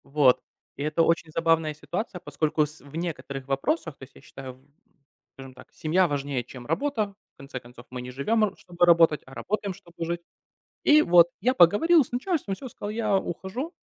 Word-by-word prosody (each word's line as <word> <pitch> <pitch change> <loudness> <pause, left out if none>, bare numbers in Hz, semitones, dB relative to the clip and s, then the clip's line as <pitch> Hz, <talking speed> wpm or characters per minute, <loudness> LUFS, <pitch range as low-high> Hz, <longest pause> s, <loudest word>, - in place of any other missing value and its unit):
Вот, 140 -3 +4 0.4
и 140 - -3
это 155 +2 +2
очень 165 -1 +1
забавная 165 -1 +2
ситуация, 180 +5 -5
поскольку 155 -2 0
с 150 0 -12
в 140 +3 -14
некоторых 140 -5 -5
вопросах, 155 - -1
то - - -13
есть, 135 - -14
я - - -15
считаю, 130 -1 -10 0.8
скажем 135 -1 -11
так, - - -16
семья 175 +4 +2
важнее, 140 -4 -2
чем 125 0 -11
работа, 205 - -1 0.2
в - - -60
конце 135 -1 -7
концов, 120 0 -15
мы 125 -1 -5
не 125 0 -7
живем, 215 - +1
р 210 - +1
чтобы 175 -1 0
работать, 165 -3 +5
а 130 - -14
работаем, 200 +4 -3
чтобы 170 -1 -8
жить. 170 +1 -3 0.6
И 305 0 +7
вот 175 - +6
я 250 +6 +2
поговорил 275 - +5
с - - -15
начальством, 255 - -1
всё, 260 +6 -8
сказал: 205 -2 -7
"Я 215 -2 +1
ухожу", 195 - -4
165 Hz, 190 wpm, -26 LUFS, 140-205 Hz, 0.8 s, И